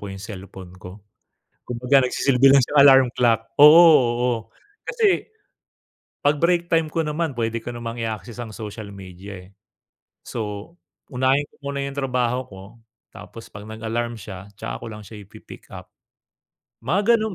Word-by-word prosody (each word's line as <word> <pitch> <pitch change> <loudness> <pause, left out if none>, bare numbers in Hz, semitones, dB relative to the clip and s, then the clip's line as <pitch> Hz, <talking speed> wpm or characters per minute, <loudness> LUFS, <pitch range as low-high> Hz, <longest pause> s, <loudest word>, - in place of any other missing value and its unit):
ko 100 - -7
'yung 95 - -9
cellphone 95 -3 -10
ko. 90 +3 -12 0.6
Kumbaga, 125 +3 +2
nagsisilbi 135 +1 +3
lang 140 0 +6
siyang 145 +4 +2
alarm 135 -2 +7
clock. 115 -2 +2 0.2
Oo 150 +3 +10 0.4
oo. 125 0 +1 0.5
Kasi 440 -3 0 1.0
'pag 145 0 +2
break 170 0 +2
time 165 -1 +2
ko 165 -1 -1
naman 150 -2 -3
pwede 115 -1 -2
ko 115 - -9
namang 120 0 -6
i-access 110 +1 -5
ang 115 - -7
social 110 -1 -8
media, 95 0 -11
eh. - - -21 0.8
So, 105 +5 -6 0.4
unahin 130 +3 +1
ko - - -26
muna 140 0 -3
'yung 140 0 -6
trabaho 125 -2 -1
ko, 95 -1 -12 0.5
tapos 115 - -12
'pag 100 +1 -11
nag-alarm 115 +2 -4
siya, 100 -1 -10
tsaka - - -6
ko - - -8
lang 105 -1 -10
siya 105 +1 -11
ipi-pick-up. - - -13 1.0
Mga 200 - +3
ganun 220 -3 -3
120 Hz, 150 wpm, -22 LUFS, 105-140 Hz, 1.0 s, Oo